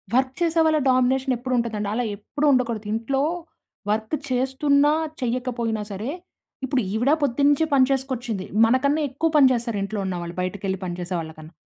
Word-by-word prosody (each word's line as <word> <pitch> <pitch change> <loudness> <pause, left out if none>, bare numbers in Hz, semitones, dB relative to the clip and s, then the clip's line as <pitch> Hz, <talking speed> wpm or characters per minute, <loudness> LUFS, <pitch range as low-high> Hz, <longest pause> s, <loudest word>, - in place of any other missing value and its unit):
Work 260 0 +2
చేసే 335 -1 +2
వాళ్ళ 315 -1 +3
domination 260 +1 +2
ఎప్పుడు 255 +2 -4
ఉంటదండి. 220 -3 -1
అలా 245 +3 0
ఎప్పుడు 250 +8 -3
ఉండకూడదు 235 -5 0
ఇంట్లో 235 +5 -1 0.7
వర్క్ 220 +5 -1
చేస్తున్నా 280 +3 +2 0.3
చెయ్యకపోయినా 240 -3 -2
సరే, 205 +6 -4 0.6
ఇప్పుడు 265 0 0
ఈవిడ 245 +6 +2
పొద్దునుంచే 285 +3 +3
పని 265 -2 +6
చేసుకొచ్చింది. 255 -7 -2 0.2
మనకన్నా 280 +6 +2
ఎక్కువ 295 +5 0
పని 285 -3 +7
చేస్తారు 235 -3 -1
ఇంట్లో 205 +1 -4
ఉన్న 190 -1 -2
వాళ్ళు 170 0 -7
బయటకి 185 +2 -4
వెళ్లి 190 -1 -1
పని 175 -1 -4
చేసే 180 +1 -4
వాళ్ళ 160 -1 -6
కన్నా. 155 +2 -12
250 Hz, 165 wpm, -23 LUFS, 215-270 Hz, 0.7 s, పని